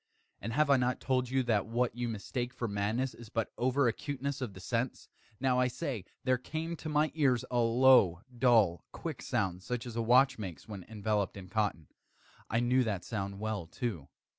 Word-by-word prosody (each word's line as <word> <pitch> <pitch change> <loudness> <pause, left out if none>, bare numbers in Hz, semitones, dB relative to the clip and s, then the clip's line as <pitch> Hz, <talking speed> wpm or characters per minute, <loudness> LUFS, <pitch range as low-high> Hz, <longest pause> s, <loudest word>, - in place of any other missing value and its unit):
And 115 +3 -4
have 150 +2 +3
I 140 - +7
not 125 0 0
told 130 -2 0
you 130 0 +1
that 110 -4 +1
what 120 0 0
you 120 -1 -2
mistake 120 +3 -4
for 120 - -2
madness 110 +6 -1
is 115 -2 -12
but 115 -1 -2
over 130 +2 +2
acuteness 140 +3 -3
of 110 -7 -4
the - - -9
sense? 115 +6 -2 0.3
now, 130 -1 +2
I 125 - +4
say, 125 - -4 0.2
there 130 -1 +2
came 160 +5 -4
to 155 - -6
my 150 +1 +2
ears 135 -6 +2
a 120 - +2
low, 115 -7 +5
dull, 115 -9 +4
quick - - -5
sound, 90 -2 -1
such 125 +4 -4
as 120 -2 -7
a 115 - 0
watch 125 +3 +4
makes 95 -3 -7
when 100 -4 -7
enveloped 105 -3 -1
in 95 -2 -9
cotton. 105 -6 -1 0.6
I 115 +3 +1
knew 125 +2 +3
that 100 -6 -2
sound 100 -2 -4
well, 105 -5 -3
too. 85 - -4
120 Hz, 195 wpm, -32 LUFS, 105-130 Hz, 0.6 s, I